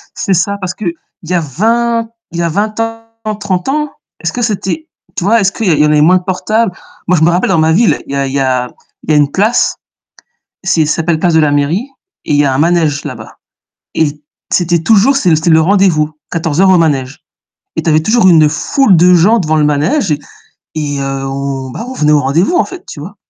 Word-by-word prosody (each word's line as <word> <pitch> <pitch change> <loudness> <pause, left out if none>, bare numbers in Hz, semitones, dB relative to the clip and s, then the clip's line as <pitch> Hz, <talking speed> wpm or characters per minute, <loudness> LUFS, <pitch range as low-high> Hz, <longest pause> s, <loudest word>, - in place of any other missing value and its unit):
C'est 195 - -1
ça 195 +3 0
parce 185 -2 -4
que 215 - -8
il 170 -1 -8
y - - -1
a 180 - +2
20 230 - 0 0.2
il 170 - -5
y - - +1
a 170 - 0
20 215 +6 -2
ans, 225 -1 -5
30 200 +1 -3
ans, 300 +1 -1 0.3
est-ce - - -3
que 245 - -3
c'était 225 - -2 0.3
tu - - -3
vois, 225 +5 +3
est-ce 195 0 +2
qu'il 220 +1 -3
y - - +4
en - - +4
il 150 - +1
y - - +4
en 150 - +2
avait 150 -1 +3
moins 180 +5 +5
de 180 - -5
portables? 215 +4 -1 0.4
Moi 180 - +3
je 160 - +1
me 165 - +5
rappelle 175 +3 0
dans 180 -4 +2
ma 160 0 +3
ville, 220 +5 +2
il - - -6
y - - -1
a 140 0 0
il 135 - -6
y 140 - 0
a 130 -2 0 0.3
il - - -2
y - - +4
a - - +4
une 145 -1 +2
place, 215 +8 +1 0.9
c'est 165 -5 +1
ça 155 - 0
s'appelle 165 -1 0
place 170 +1 +1
de 160 - +5
la 150 -2 +2
mairie 150 - 0 0.4
et - - -2
il - - +3
y 145 - +3
a 135 - +1
un - - -1
manège 160 -2 +1
là-bas - - -9 0.6
et 160 - +2 0.5
c'était 175 -1 +2
toujours 225 +8 +3
c'est 185 -10 +1
l 160 - +4
c'est 160 +2 0
le 160 0 +5
rendez-vous, 170 -4 +2 0.2
14:00 165 +3 +1
au 185 - +5
manège, 145 -2 -1 0.5
et 160 - -1
tu 165 - -3
avais 155 0 +3
toujours 215 +1 +3
une 160 -4 +5
foule 190 - +2
de 180 +2 +5
gens 195 +7 +4
devant 155 -5 0
le 150 - +2
manège 155 - +1
et 145 - -1 0.6
et 145 -2 -3
heu, 135 0 -3
on 135 -1 -4
bah, 225 - -6
on 260 - -6
venait 150 -10 +1
au 150 - +4
rendez-vous 160 - +1
en - - +2
fait, 370 -1 -10
tu - - -9
vois? 190 +7 -9
170 Hz, 250 wpm, -13 LUFS, 150-205 Hz, 0.9 s, moins